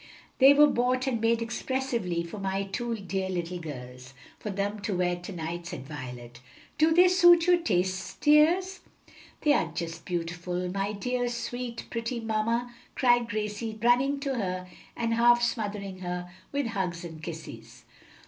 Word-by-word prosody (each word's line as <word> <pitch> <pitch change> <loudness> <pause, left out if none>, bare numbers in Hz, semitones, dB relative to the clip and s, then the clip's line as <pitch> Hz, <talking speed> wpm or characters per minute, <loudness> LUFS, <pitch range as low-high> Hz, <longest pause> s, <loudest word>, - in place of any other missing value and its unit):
"They 270 +1 +9
were 295 +1 +8
bought 255 -1 +1
and 245 -5 -1
made 230 0 +2
expressly 235 -7 -2
for 170 +5 -8
my 195 0 -1
two 235 +4 -3
dear 190 -2 -3
little 180 -1 -3
girls; 125 -4 -9 0.2
for 210 - -5
them 200 +1 -2
to 200 -2 -2
wear 180 0 +1
to 175 +3 -8
night," 170 0 -5
said 135 - -7
Violet. 125 -4 -8 0.4
"Do 315 +1 +5
they 355 +3 +7
suit 350 -2 +6
your 355 -1 +5
taste, 185 - -1
dears?" 340 +6 +4 0.6
"They 300 -1 +4
are 165 - +1
just 165 0 -5
beautiful, 175 +1 -3
my 195 +1 -1
dear, 245 +4 -1
sweet, 240 0 -5
pretty 230 +1 -3
mamma," 230 +2 -1 0.2
cried 240 -2 +3
Gracie, 215 +1 -3
running 250 +5 +3
to 275 -1 -1
her 185 -3 -3 0.3
and 230 -1 0
half 240 +1 +5
smothering 205 -5 -2
her 180 -1 -5 0.2
with 285 -1 -1
hugs 180 -5 -3
and 160 -2 -9
kisses. 125 -8 -9
210 Hz, 160 wpm, -28 LUFS, 175-245 Hz, 0.6 s, They